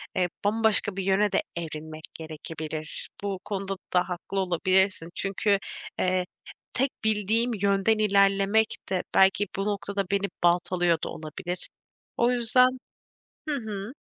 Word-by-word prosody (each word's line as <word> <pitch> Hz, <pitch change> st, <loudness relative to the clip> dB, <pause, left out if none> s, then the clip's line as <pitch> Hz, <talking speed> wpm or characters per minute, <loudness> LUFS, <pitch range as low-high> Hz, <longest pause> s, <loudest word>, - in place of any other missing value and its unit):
eee, 180 Hz, -1 st, +1 dB, 0.2 s
bambaşka 215 Hz, -2 st, +2 dB
bir 195 Hz, -, -1 dB
yöne 195 Hz, +2 st, +2 dB
de -, -, +2 dB
evrilmek 155 Hz, -1 st, -6 dB
gerekebilir. 155 Hz, -1 st, -6 dB
Bu 200 Hz, -2 st, -2 dB
konuda 195 Hz, -1 st, -3 dB, 0.2 s
da 180 Hz, 0 st, +2 dB
haklı 180 Hz, +2 st, -3 dB
olabilirsin. 185 Hz, -1 st, +2 dB
Çünkü, 200 Hz, +1 st, +1 dB, 0.4 s
eee, 185 Hz, 0 st, +1 dB, 0.5 s
tek 265 Hz, +1 st, +1 dB
bildiğim 220 Hz, +3 st, +2 dB
yönden 200 Hz, +1 st, +2 dB
ilerlemek 200 Hz, +1 st, +3 dB
de 185 Hz, -2 st, 0 dB
belki 195 Hz, +2 st, +5 dB
bu 195 Hz, -, -1 dB
noktada 200 Hz, -1 st, -2 dB
beni 200 Hz, 0 st, +1 dB, 0.2 s
baltalıyor 175 Hz, 0 st, +3 dB
da -, -, -2 dB
olabilir. 175 Hz, +3 st, -5 dB, 0.5 s
O 235 Hz, +1 st, +3 dB
yüzden 250 Hz, +2 st, +3 dB, 0.7 s
hı 300 Hz, -, +1 dB
hı. 215 Hz, -3 st, -5 dB
195 Hz, 130 wpm, -27 LUFS, 180-210 Hz, 0.7 s, belki